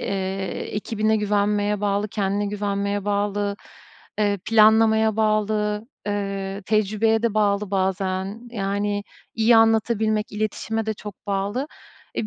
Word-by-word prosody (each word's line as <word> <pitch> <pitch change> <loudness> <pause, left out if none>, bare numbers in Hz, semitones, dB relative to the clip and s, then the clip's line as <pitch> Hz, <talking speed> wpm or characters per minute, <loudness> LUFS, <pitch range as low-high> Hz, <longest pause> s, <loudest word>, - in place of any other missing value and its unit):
Eee, - - -4 0.7
ekibine 215 +1 0
güvenmeye 205 0 +1
bağlı, 205 0 0
kendine 205 0 -1
güvenmeye 200 0 -2
bağlı, 205 0 -1 0.6
eee, 205 -1 +1
planlamaya 220 0 +5
bağlı, 215 0 0 0.2
ııı 195 -1 -3
tecrübeye 215 +2 +1
de 230 -2 0
bağlı 205 -1 +1
bazen. 190 +3 -2
Yani, 205 -1 -1 0.3
iyi 225 +1 +5
anlatabilmek, 220 -1 +2
iletişime 215 +1 -2
de 220 - -1
çok 205 0 -11
bağlı. 200 +7 -1 0.5
Eee, 215 - -2
210 Hz, 115 wpm, -23 LUFS, 200-220 Hz, 0.7 s, planlamaya